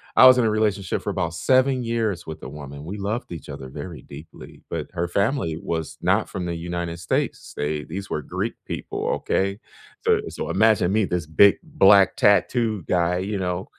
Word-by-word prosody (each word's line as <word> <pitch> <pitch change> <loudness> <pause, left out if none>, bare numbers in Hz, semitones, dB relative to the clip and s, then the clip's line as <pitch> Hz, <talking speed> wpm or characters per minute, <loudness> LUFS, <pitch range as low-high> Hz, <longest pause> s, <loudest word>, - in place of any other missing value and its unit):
I 130 - +9
was 130 0 +8
in 120 - +3
a 110 - +3
relationship 105 -3 0
for - - -4
about 90 -4 -2
7 130 +6 +2
years 110 -7 -2
with 80 -1 -8
a - - -6
woman. 70 0 -9
We 100 +5 -5
loved 105 +1 -3
each 80 -4 -8
other 70 -2 -7
very 75 +4 -8
deeply, 75 +3 -12
but - - -3
her 85 -1 -1
family 100 - 0
was 80 -2 -4
not - - +2
from 90 - -4
the 85 - -2
United 85 0 -4
States. 90 - -2
They 75 +1 -2
these 95 +6 -7
were 75 - -1
Greek - - -3
people, - - -4
okay? 100 +1 -1 0.5
So - - +4
so - - -5
imagine 110 -5 +3
me, 110 -1 +2
this 90 -3 -2
big 95 +6 +5
Black 95 0 +5
tattoo 110 0 +2
guy, 90 0 +1
you 100 +2 -3
know, 90 0 -3
90 Hz, 190 wpm, -23 LUFS, 85-105 Hz, 0.5 s, I